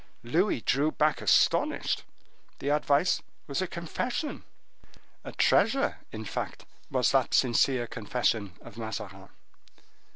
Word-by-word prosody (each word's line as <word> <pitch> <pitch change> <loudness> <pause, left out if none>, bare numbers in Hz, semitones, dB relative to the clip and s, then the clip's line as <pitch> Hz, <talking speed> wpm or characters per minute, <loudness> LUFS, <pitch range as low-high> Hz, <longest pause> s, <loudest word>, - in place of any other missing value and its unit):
Louis 160 - +1
drew 145 +7 +2
back 155 0 +1
astonished. - - +2 0.6
The 140 - -3
advice 145 +3 +2 0.2
was 140 +4 -2
a 185 - -1
confession—a 185 - -7
treasure, 245 +7 +2
in 110 0 -6
fact, - - -5 0.2
was - - +2
that - - +2
sincere 125 0 +3
confession 110 -3 -1
of 115 - -12
Mazarin. 105 -4 -6
135 Hz, 105 wpm, -28 LUFS, 110-170 Hz, 0.6 s, sincere